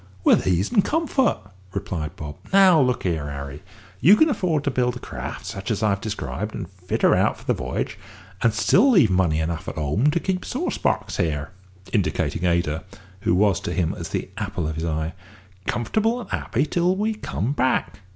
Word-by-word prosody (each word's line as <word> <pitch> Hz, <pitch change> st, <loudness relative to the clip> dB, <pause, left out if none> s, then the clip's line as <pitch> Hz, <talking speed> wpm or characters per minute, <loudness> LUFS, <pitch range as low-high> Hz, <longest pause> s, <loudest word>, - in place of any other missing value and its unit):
"With -, -, +4 dB
ease 95 Hz, +2 st, +1 dB
and 200 Hz, -, +4 dB
comfort," 285 Hz, -6 st, +1 dB, 0.4 s
replied 75 Hz, -4 st, -4 dB
Bob. 75 Hz, -1 st, -7 dB
"Now 190 Hz, -5 st, +7 dB
look 125 Hz, -2 st, +1 dB
here, 80 Hz, -5 st, -1 dB
Harry. 70 Hz, +1 st, -6 dB, 0.4 s
You 175 Hz, -, +7 dB
can 315 Hz, +6 st, +4 dB
afford 170 Hz, -, 0 dB
to 140 Hz, -, 0 dB
build 125 Hz, -1 st, +1 dB
a -, -, -6 dB
craft -, -, -7 dB
such 100 Hz, 0 st, -5 dB
as 110 Hz, -2 st, -1 dB
I 110 Hz, -, +4 dB
have 100 Hz, 0 st, 0 dB
described, 105 Hz, 0 st, -4 dB
and -, -, -5 dB
fit 90 Hz, -1 st, -4 dB
her -, -, +6 dB
out -, -, +2 dB
for -, -, -15 dB
the -, -, +1 dB
v'y'ge, -, -, -3 dB, 0.4 s
and 115 Hz, -, +4 dB
still 215 Hz, -, +4 dB
leave 175 Hz, -, +5 dB
money 90 Hz, -4 st, +2 dB
enough 80 Hz, 0 st, -3 dB
at -, -, -4 dB
home 75 Hz, -, +1 dB
to 165 Hz, +3 st, +1 dB
keep 185 Hz, +1 st, -2 dB
sauce -, -, -3 dB
box -, -, 0 dB
here," 75 Hz, -3 st, -1 dB, 0.4 s
(indicating 95 Hz, -3 st, 0 dB
Ada, 85 Hz, -3 st, +1 dB, 0.4 s
who 90 Hz, -, +1 dB
was 100 Hz, -1 st, +3 dB
to 100 Hz, -, -4 dB
him 85 Hz, -4 st, 0 dB
as -, -, -6 dB
the -, -, -3 dB
apple 95 Hz, -6 st, -3 dB
of 80 Hz, -, -2 dB
his 80 Hz, +2 st, -3 dB
eye) 80 Hz, 0 st, -2 dB, 0.5 s
"comfortable 220 Hz, -, 0 dB
and 225 Hz, -, -9 dB
happy 120 Hz, -, -1 dB
like 150 Hz, -, -1 dB
till 175 Hz, +2 st, +2 dB
we 215 Hz, +3 st, 0 dB
come 130 Hz, -, -3 dB
back. 130 Hz, -6 st, 0 dB
105 Hz, 200 wpm, -23 LUFS, -, 0.5 s, Now